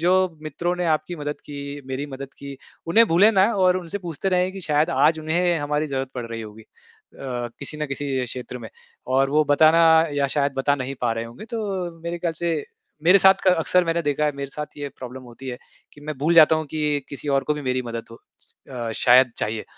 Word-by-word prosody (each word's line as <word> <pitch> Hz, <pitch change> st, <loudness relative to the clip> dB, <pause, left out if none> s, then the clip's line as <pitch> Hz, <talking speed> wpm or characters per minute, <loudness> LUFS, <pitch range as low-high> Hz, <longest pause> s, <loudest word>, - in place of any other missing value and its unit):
जो 180 Hz, +3 st, +3 dB, 0.3 s
मित्रों 170 Hz, +3 st, -2 dB
ने 180 Hz, -, -2 dB
आपकी 155 Hz, +2 st, -1 dB
मदद 145 Hz, -1 st, -5 dB
की, 140 Hz, 0 st, -7 dB
मेरी 135 Hz, +2 st, -4 dB
मदद 135 Hz, -1 st, -8 dB
की, 140 Hz, -1 st, -8 dB, 0.3 s
उन्हें 225 Hz, +8 st, +5 dB
भूले 185 Hz, +7 st, +5 dB
ना 190 Hz, -2 st, +5 dB
और 185 Hz, -1 st, +4 dB
उनसे 185 Hz, +2 st, -4 dB
पूछते 175 Hz, 0 st, -4 dB
रहें 180 Hz, 0 st, +1 dB
कि 195 Hz, -, -8 dB
शायद 155 Hz, -1 st, +1 dB
आज 160 Hz, -1 st, +3 dB
उन्हें 170 Hz, +2 st, +1 dB
हमारी 150 Hz, +1 st, -1 dB
ज़रूरत 135 Hz, -2 st, -3 dB
पड़ 120 Hz, -2 st, -4 dB
रही 115 Hz, 0 st, -6 dB
होगी 110 Hz, +1 st, -11 dB
अ, -, -, -27 dB, 0.9 s
किसी 145 Hz, +2 st, -2 dB
ना 150 Hz, 0 st, -3 dB
किसी 140 Hz, -2 st, -2 dB
क्षेत्र 125 Hz, +1 st, -6 dB
में 115 Hz, -2 st, -9 dB, 0.4 s
और 135 Hz, +1 st, +2 dB
वो 155 Hz, +1 st, +3 dB
बताना 155 Hz, +3 st, +5 dB, 0.3 s
या 140 Hz, -1 st, +1 dB
शायद 140 Hz, -1 st, +1 dB
बता 140 Hz, +1 st, +2 dB
नहीं 135 Hz, -1 st, -4 dB
पा 120 Hz, -2 st, +1 dB
रहे 115 Hz, 0 st, -3 dB
होंगे। 115 Hz, -, -10 dB
तो 230 Hz, -, -3 dB, 0.4 s
मेरे 170 Hz, +1 st, -4 dB
ख्याल 170 Hz, -1 st, -2 dB
से 165 Hz, -4 st, 0 dB, 0.4 s
मेरे 180 Hz, +4 st, +7 dB
साथ 190 Hz, 0 st, +7 dB
क 185 Hz, -, +6 dB
अक्सर 180 Hz, +2 st, +2 dB
मैंने 165 Hz, 0 st, 0 dB
देखा 145 Hz, 0 st, 0 dB
है, 150 Hz, -, +1 dB
मेरे 140 Hz, -1 st, -6 dB
साथ 150 Hz, +1 st, -7 dB
यह 145 Hz, -1 st, -5 dB
प्रॉब्लम 130 Hz, +1 st, -8 dB
होती 125 Hz, +2 st, -11 dB
है 125 Hz, -, -4 dB, 0.4 s
कि 145 Hz, -, -16 dB
मैं 155 Hz, -1 st, -5 dB
भूल 160 Hz, +5 st, +2 dB
जाता 160 Hz, -1 st, +7 dB
हूँ 155 Hz, -, -3 dB
कि 150 Hz, -2 st, 0 dB
किसी 145 Hz, +1 st, -7 dB
और 135 Hz, -1 st, +1 dB
को 150 Hz, -, 0 dB
भी 150 Hz, -, -6 dB
मेरी 130 Hz, -1 st, -1 dB
मदद 115 Hz, -1 st, -6 dB
हो 115 Hz, -, -11 dB, 0.5 s
अ, 120 Hz, -3 st, -4 dB
शायद 125 Hz, +2 st, +5 dB
चाहिए। 110 Hz, 0 st, -3 dB
145 Hz, 225 wpm, -23 LUFS, 130-165 Hz, 0.9 s, मेरे